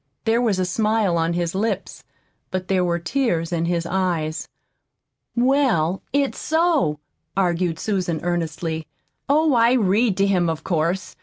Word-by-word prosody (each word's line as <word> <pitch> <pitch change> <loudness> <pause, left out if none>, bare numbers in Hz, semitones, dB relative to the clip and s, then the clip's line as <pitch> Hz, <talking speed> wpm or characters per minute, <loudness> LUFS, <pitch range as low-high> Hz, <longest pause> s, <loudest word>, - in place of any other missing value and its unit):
There 230 +1 +2
was 220 -6 +1
a 185 - +1
smile 210 0 +1
on 165 0 +1
his 170 -1 -1
lips, 200 0 -2 0.5
but 185 -1 -4
there 185 -2 +2
were 170 -1 +1
tears 170 -3 -1
in 170 0 0
his 170 -1 -1
eyes. 170 -4 -1 0.9
"Well, 240 - +2
it's 280 +1 0
so," 320 - +1 0.4
argued 175 -3 +1
Susan 180 -6 -1
earnestly. 165 -2 -2 0.4
"Oh, 305 +1 +4
I 235 0 +4
read 215 -2 +2
to 195 - +3
him, 180 -4 +2
of 160 -1 -3
course. 170 +2 -1
185 Hz, 145 wpm, -22 LUFS, 170-225 Hz, 0.9 s, Oh